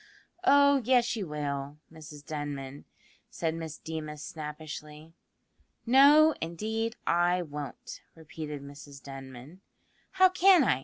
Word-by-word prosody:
"Oh 280 Hz, -3 st, +5 dB
yes, 245 Hz, 0 st, +2 dB
you 205 Hz, -5 st, -4 dB
will, 145 Hz, -1 st, -4 dB, 0.2 s
Mrs 150 Hz, -2 st, -12 dB
Denman," 145 Hz, -2 st, -6 dB, 0.4 s
said 165 Hz, -2 st, -2 dB
Miss 160 Hz, -2 st, -6 dB
Deemas 155 Hz, -2 st, -7 dB
snappishly. 150 Hz, 0 st, -8 dB, 0.7 s
"No, 285 Hz, +5 st, +6 dB
indeed, 220 Hz, +8 st, -3 dB
I 175 Hz, +1 st, +2 dB
won't," 145 Hz, -4 st, -8 dB
repeated 150 Hz, -2 st, -8 dB
Mrs 140 Hz, 0 st, -12 dB
Denman; 135 Hz, +5 st, -11 dB, 0.5 s
"how 375 Hz, -1 st, +6 dB
can 370 Hz, -2 st, +5 dB
I? 130 Hz, -, +2 dB
160 Hz, 110 wpm, -29 LUFS, 145-225 Hz, 0.7 s, No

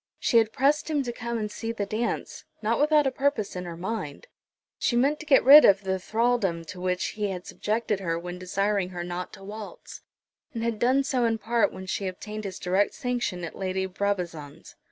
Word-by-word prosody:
She 235 Hz, -, +4 dB
had 220 Hz, -1 st, +1 dB
pressed 285 Hz, +6 st, +2 dB
him 295 Hz, -3 st, +1 dB
to 245 Hz, -, -3 dB
come 235 Hz, 0 st, -4 dB
and 210 Hz, -1 st, -3 dB
see 225 Hz, +2 st, -4 dB
the 210 Hz, -3 st, -3 dB
dance, 220 Hz, +4 st, -3 dB, 0.2 s
not 225 Hz, +2 st, +1 dB
without 300 Hz, 0 st, +4 dB
a 270 Hz, -, +2 dB
purpose 265 Hz, -8 st, -1 dB
in 180 Hz, 0 st, -4 dB
her 170 Hz, -1 st, -7 dB
mind. 185 Hz, -5 st, -5 dB, 0.5 s
She 240 Hz, -, +1 dB
meant 280 Hz, +5 st, +2 dB
to 320 Hz, -, -10 dB
get 275 Hz, -3 st, +6 dB
rid 290 Hz, +4 st, +10 dB
of 200 Hz, 0 st, +5 dB
the 190 Hz, 0 st, -1 dB
thraldom 215 Hz, -5 st, 0 dB
to 180 Hz, -, -8 dB
which 180 Hz, 0 st, 0 dB
he 210 Hz, -1 st, -2 dB
had 180 Hz, -1 st, -5 dB
subjected 215 Hz, -1 st, -1 dB
her 165 Hz, -3 st, -1 dB
when 175 Hz, +1 st, -6 dB
desiring 195 Hz, +1 st, 0 dB
her 175 Hz, -1 st, -5 dB
not 175 Hz, +1 st, -5 dB
to 195 Hz, -, -12 dB
waltz, 210 Hz, +1 st, -9 dB, 0.5 s
and 225 Hz, -, -2 dB
had 230 Hz, -2 st, -1 dB
done 260 Hz, +3 st, +3 dB
so 265 Hz, -3 st, 0 dB
in 225 Hz, -1 st, +1 dB
part 230 Hz, +2 st, +1 dB
when 190 Hz, -, -8 dB
she 195 Hz, +1 st, -2 dB
obtained 210 Hz, +3 st, -6 dB
his 190 Hz, -2 st, -5 dB
direct 190 Hz, +3 st, +1 dB
sanction 245 Hz, -, -2 dB
at 170 Hz, -, -6 dB
Lady 190 Hz, 0 st, -2 dB
Brabazon's. 180 Hz, -6 st, -4 dB
210 Hz, 210 wpm, -26 LUFS, 185-240 Hz, 0.5 s, rid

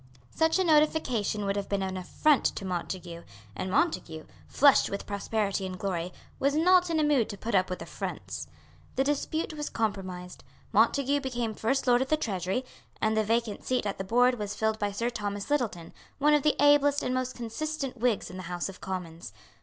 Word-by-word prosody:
Such 320 Hz, +1 st, +2 dB
a 380 Hz, -, +2 dB
notification 300 Hz, -, +2 dB
would 195 Hz, 0 st, 0 dB
have 200 Hz, -1 st, -3 dB
been 200 Hz, -1 st, 0 dB
an 190 Hz, 0 st, -3 dB
affront 260 Hz, +10 st, +2 dB
to 195 Hz, -, -1 dB
Montague; 175 Hz, -1 st, -4 dB, 0.3 s
and 185 Hz, -, -3 dB
Montague, 170 Hz, -, 0 dB, 0.2 s
flushed 280 Hz, 0 st, +5 dB
with 200 Hz, -, -4 dB
prosperity 200 Hz, -1 st, -1 dB
and 185 Hz, -1 st, -4 dB
glory, 180 Hz, -2 st, -2 dB, 0.3 s
was 280 Hz, +1 st, +2 dB
not 360 Hz, +2 st, +5 dB
in 325 Hz, -1 st, +1 dB
a -, -, +3 dB
mood 285 Hz, -7 st, +2 dB
to 200 Hz, -, -6 dB
put 230 Hz, +4 st, -4 dB
up 185 Hz, -1 st, +3 dB
with 180 Hz, -, -4 dB
affronts. 95 Hz, -, -6 dB, 0.5 s
The 265 Hz, -, +2 dB
dispute 295 Hz, +3 st, -1 dB
was 295 Hz, -1 st, -4 dB
compromised. 185 Hz, -5 st, -4 dB, 0.3 s
Montague 280 Hz, +1 st, +3 dB
became 240 Hz, -4 st, -2 dB
First 260 Hz, +6 st, 0 dB
Lord 245 Hz, -1 st, +4 dB
of 265 Hz, -, -1 dB
the 310 Hz, -, +3 dB
Treasury; 195 Hz, -, -2 dB, 0.3 s
and 220 Hz, 0 st, +1 dB
the 220 Hz, -, +3 dB
vacant 225 Hz, 0 st, -1 dB
seat 255 Hz, -4 st, 0 dB
at 200 Hz, -, -3 dB
the -, -, -1 dB
Board 245 Hz, +4 st, +3 dB
was 205 Hz, 0 st, -3 dB
filled 220 Hz, 0 st, 0 dB
by 205 Hz, -1 st, 0 dB
Sir 230 Hz, +4 st, -1 dB
Thomas 205 Hz, +1 st, -4 dB
Littleton, 220 Hz, -, -1 dB, 0.2 s
one 295 Hz, +1 st, +4 dB
of 295 Hz, -, +4 dB
the 300 Hz, +1 st, +2 dB
ablest 290 Hz, 0 st, +5 dB
and 250 Hz, -, -1 dB
most 255 Hz, 0 st, -2 dB
consistent 270 Hz, +4 st, -4 dB
Whigs 235 Hz, -6 st, 0 dB
in 185 Hz, -, -8 dB
the 185 Hz, -2 st, -7 dB
House 175 Hz, +1 st, -2 dB
of 195 Hz, -, -11 dB
Commons. 170 Hz, -, -6 dB
220 Hz, 195 wpm, -28 LUFS, 190-280 Hz, 0.5 s, flushed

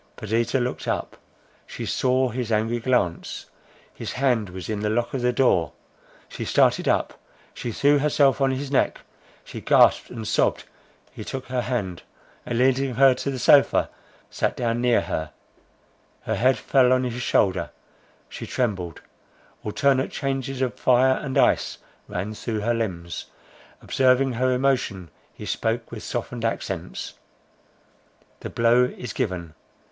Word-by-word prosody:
Perdita 115 Hz, +5 st, 0 dB
looked 125 Hz, 0 st, -3 dB
up; -, -, -2 dB, 0.5 s
she -, -, -6 dB
saw 130 Hz, 0 st, +1 dB
his 120 Hz, -1 st, -4 dB
angry 110 Hz, +2 st, +1 dB
glance; 115 Hz, -9 st, -1 dB, 0.5 s
his -, -, -6 dB
hand 125 Hz, -6 st, +1 dB
was 90 Hz, -1 st, -7 dB
on 105 Hz, -1 st, -2 dB
the 105 Hz, 0 st, -1 dB
lock 120 Hz, +2 st, -1 dB
of 135 Hz, -, -2 dB
the 125 Hz, 0 st, +2 dB
door. 115 Hz, -, +2 dB, 0.5 s
She -, -, -6 dB
started -, -, +2 dB
up, -, -, 0 dB, 0.3 s
she 120 Hz, -, -5 dB
threw 145 Hz, +5 st, +3 dB
herself 140 Hz, -1 st, +3 dB
on 135 Hz, -, +4 dB
his 135 Hz, +1 st, -3 dB
neck, 135 Hz, -, +1 dB, 0.4 s
she -, -, -9 dB
gasped -, -, +4 dB
and 110 Hz, -3 st, -6 dB
sobbed; -, -, +1 dB, 0.5 s
he -, -, -8 dB
took 135 Hz, -1 st, -6 dB
her 125 Hz, -1 st, 0 dB
hand, 105 Hz, -9 st, -3 dB, 0.5 s
and 120 Hz, -, -2 dB
leading 130 Hz, 0 st, +2 dB
her 135 Hz, +1 st, +6 dB
to 125 Hz, -, -4 dB
the 135 Hz, -, -3 dB
sofa, 140 Hz, +3 st, +4 dB, 0.4 s
sat -, -, -1 dB
down 120 Hz, 0 st, -1 dB
near 120 Hz, -1 st, +3 dB
her. 80 Hz, -1 st, -4 dB, 0.9 s
Her -, -, -2 dB
head 130 Hz, +3 st, +3 dB
fell 130 Hz, -2 st, +3 dB
on 130 Hz, 0 st, +3 dB
his 125 Hz, 0 st, -3 dB
shoulder, 90 Hz, -8 st, +1 dB, 0.6 s
she -, -, -8 dB
trembled, 95 Hz, -, -2 dB, 0.6 s
alternate 130 Hz, +5 st, +1 dB
changes 135 Hz, -1 st, -2 dB
of 125 Hz, -, -3 dB
fire 130 Hz, +1 st, +4 dB
and 135 Hz, -3 st, -3 dB
ice -, -, +2 dB, 0.3 s
ran 100 Hz, +4 st, -4 dB
through 110 Hz, 0 st, -4 dB
her 120 Hz, +3 st, +1 dB
limbs: 90 Hz, -7 st, -4 dB, 0.6 s
observing 130 Hz, 0 st, +3 dB
her 130 Hz, +2 st, +1 dB
emotion 125 Hz, -, 0 dB, 0.2 s
he -, -, -10 dB
spoke 115 Hz, +1 st, -2 dB
with 115 Hz, -2 st, -7 dB
softened 120 Hz, 0 st, -4 dB
accents: 95 Hz, -6 st, -3 dB, 1.3 s
"The -, -, -6 dB
blow 120 Hz, +2 st, +4 dB
is 125 Hz, -3 st, -6 dB
given. 85 Hz, -6 st, -3 dB
120 Hz, 150 wpm, -24 LUFS, 110-130 Hz, 1.3 s, her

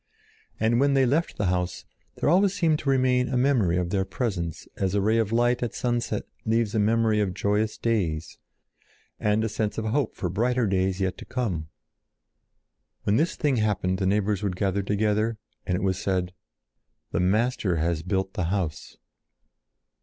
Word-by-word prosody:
And 115 Hz, +2 st, +2 dB
when 140 Hz, 0 st, +3 dB
they 135 Hz, -1 st, +4 dB
left 150 Hz, +7 st, 0 dB
the 105 Hz, -, 0 dB
house, 90 Hz, 0 st, -1 dB, 0.4 s
always 190 Hz, +5 st, +4 dB
there -, -, -6 dB
seemed 160 Hz, -5 st, +2 dB
to 140 Hz, -, -2 dB
remain 130 Hz, -1 st, +2 dB
a 130 Hz, -, 0 dB
memory 120 Hz, -10 st, +2 dB
of 90 Hz, -1 st, -1 dB
their 95 Hz, -2 st, +1 dB
presence 95 Hz, -, -3 dB
as 95 Hz, 0 st, -1 dB
a -, -, +3 dB
ray 110 Hz, +3 st, +2 dB
of 110 Hz, -2 st, 0 dB
light 120 Hz, +1 st, +2 dB
at 120 Hz, -, -3 dB
sunset 120 Hz, -1 st, -1 dB, 0.2 s
leaves 110 Hz, -1 st, +1 dB
a 110 Hz, -, +1 dB
memory 110 Hz, 0 st, +2 dB
of 95 Hz, -4 st, 0 dB
joyous 105 Hz, +2 st, 0 dB
days 90 Hz, -9 st, -1 dB, 0.8 s
and 105 Hz, +1 st, +1 dB
a -, -, +1 dB
sense 105 Hz, 0 st, -2 dB
of 110 Hz, -, -2 dB
hope 125 Hz, +3 st, 0 dB
for 90 Hz, -, -2 dB
brighter 120 Hz, +7 st, +1 dB
days 95 Hz, -1 st, 0 dB
yet 95 Hz, -1 st, -1 dB
to -, -, -9 dB
come. 95 Hz, -12 st, -3 dB, 1.3 s
When 105 Hz, +2 st, +2 dB
this 165 Hz, +4 st, +1 dB
thing 145 Hz, -4 st, +1 dB
happened 100 Hz, -4 st, 0 dB
the 95 Hz, -, +1 dB
neighbors 105 Hz, 0 st, +1 dB
would 100 Hz, -3 st, -1 dB
gather 100 Hz, +1 st, 0 dB
together 105 Hz, +3 st, 0 dB, 0.3 s
and 90 Hz, -, +1 dB
it 90 Hz, -, -2 dB
was 95 Hz, -1 st, 0 dB
said: 90 Hz, -2 st, -1 dB, 0.8 s
"The -, -, 0 dB
Master 100 Hz, 0 st, +1 dB
has 80 Hz, 0 st, 0 dB
built 95 Hz, +2 st, -2 dB
the 90 Hz, -, -1 dB
house." 90 Hz, -4 st, -3 dB
105 Hz, 175 wpm, -26 LUFS, 95-120 Hz, 1.3 s, they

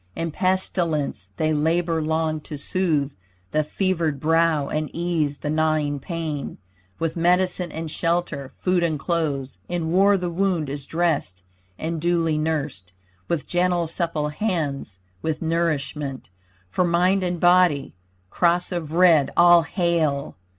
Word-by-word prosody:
In 165 Hz, 0 st, -3 dB
pestilence, 165 Hz, -, -1 dB
they 155 Hz, +5 st, +1 dB
labor 165 Hz, +2 st, +1 dB
long 160 Hz, 0 st, 0 dB
to 150 Hz, -, -7 dB
soothe 150 Hz, -3 st, 0 dB, 0.4 s
The 155 Hz, -, +2 dB
fevered 165 Hz, -3 st, -1 dB
brow 160 Hz, -1 st, +2 dB
and 155 Hz, +1 st, -2 dB
ease 165 Hz, -4 st, -1 dB
the 150 Hz, -, -4 dB
gnawing 155 Hz, -2 st, +1 dB
pain 155 Hz, -1 st, -4 dB, 0.4 s
With 165 Hz, -1 st, -2 dB
medicine 180 Hz, 0 st, +1 dB
and 160 Hz, -1 st, -5 dB
shelter, 165 Hz, -5 st, -1 dB
food 180 Hz, -1 st, +1 dB
and 165 Hz, -3 st, 0 dB
clothes. 145 Hz, -4 st, -2 dB
In 170 Hz, -2 st, -2 dB
war 195 Hz, +3 st, +5 dB
the 180 Hz, -2 st, -3 dB
wound 175 Hz, -5 st, 0 dB
is 140 Hz, -1 st, -6 dB
dressed 160 Hz, -, -1 dB, 0.3 s
and 160 Hz, 0 st, -3 dB
duly 165 Hz, -2 st, +1 dB
nursed 145 Hz, -, -3 dB, 0.3 s
With 155 Hz, +3 st, -1 dB
gentle 175 Hz, -1 st, +1 dB
supple 165 Hz, -2 st, -2 dB
hands 150 Hz, -, -2 dB, 0.2 s
with 160 Hz, 0 st, -2 dB
nourishment 150 Hz, -, -2 dB, 0.4 s
For 180 Hz, -, +1 dB
mind 180 Hz, +3 st, +2 dB
and 180 Hz, -1 st, -2 dB
body. 175 Hz, -5 st, +4 dB, 0.4 s
Cross 175 Hz, +1 st, +2 dB
of 165 Hz, -4 st, -4 dB
red, 170 Hz, -5 st, +5 dB
all 175 Hz, 0 st, +7 dB
hail! 165 Hz, -5 st, 0 dB
165 Hz, 135 wpm, -23 LUFS, 150-175 Hz, 0.4 s, all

